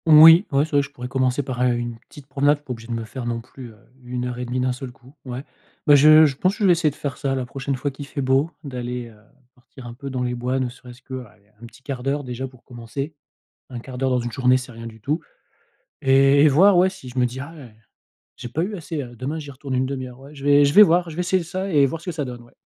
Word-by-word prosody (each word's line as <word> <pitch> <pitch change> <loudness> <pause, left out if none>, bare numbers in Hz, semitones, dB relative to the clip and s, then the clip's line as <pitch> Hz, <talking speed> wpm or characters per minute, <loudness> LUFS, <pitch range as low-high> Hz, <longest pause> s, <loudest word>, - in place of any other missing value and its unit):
Oui, 160 +4 +9
ouais, 140 +1 +3
c'est 160 - -14
vrai, 145 -1 +4
je 140 - -6
pourrais 125 -3 -8
commencer 130 +1 0
par, 125 -2 -4
heu, 125 -1 +3
une 120 -1 -4
petite 145 +4 -15
promenade. 145 +2 +2
Je - - -26
suis - - -37
pas 135 - -6
obligé 115 -2 -7
de 120 - -4
me 115 -1 -3
faire 120 +2 -7
non 120 -1 -2
plus, 125 +1 -11
heu, 110 - -16 0.3
1 125 0 -4
heure 125 0 -4
et 125 - -3
demie 125 +1 -2
d'un 125 0 +1
seul 125 0 -7
coup, 130 +1 -20
ouais. 125 +1 -6 0.4
Bah, 145 - +6
je 155 +2 +8
je 140 -3 0
pense 190 +6 +1
que - - -3
vais 190 - +6
essayer 165 -2 +3
de 145 - -10
faire 140 -3 -5
ça 135 -2 -1
la 130 -1 -2
prochaine 135 +2 -4
fois 140 +3 -3
qu'il 140 +1 -9
fait 140 - -4
beau, 135 +4 +2
d'aller, 125 -3 -5
heu, 110 -2 -19 0.3
partir 125 +1 -15
un 120 - -8
peu 140 +3 -8
dans 130 -1 -2
les 125 0 -1
bois 125 +2 -2
ne 130 -1 -1
serait-ce 125 0 -14
que, 130 -1 -6
allez, 105 -2 -22 0.2
un - - -9
petit 120 +4 -19
1/4 135 -3 -5
d'heure 140 +2 -1
déjà 130 +1 -5
pour 130 -2 -19
commencer. 125 +5 -6 0.6
1/4 125 +1 -8
d'heure 130 0 0
dans 125 - +2
une 120 0 -4
journée, 125 +2 +3
c'est 125 0 -8
rien 115 0 -10
du 110 -1 -10
tout. 150 +9 -1 0.8
Et 135 +1 +5
et - - +7
voir, 180 +7 +5
ouais, 185 +2 +4
si 185 -9 -12
je 125 +1 -6
me 125 - +4
dis: 125 +2 -3
«Ah, 140 +5 -8
ouais, 125 -8 -13 0.6
j'ai 120 - -7
pas 150 +7 -2
eu 205 +2 -4
assez, 160 -3 -5
heu, 120 -2 -10
demain, 140 +7 -4
j'y 145 -2 -8
retourne 135 0 -6
1/2 130 0 -2
heure, 125 +1 -14
ouais», 140 +2 -13
je 140 -1 -10
vais 145 0 +6
je 140 - 0
vais 210 - +10
voir. 175 -2 +4
Je 155 - -9
vais - - -2
essayer 180 +1 +1
ça 185 +3 -4
et 145 -3 +5
voir 160 +4 -5
ce - - -15
que 180 - -2
ça 150 -3 -3
donne, 120 -1 -8
ouais. 120 - -20
130 Hz, 295 wpm, -22 LUFS, 125-145 Hz, 0.8 s, vais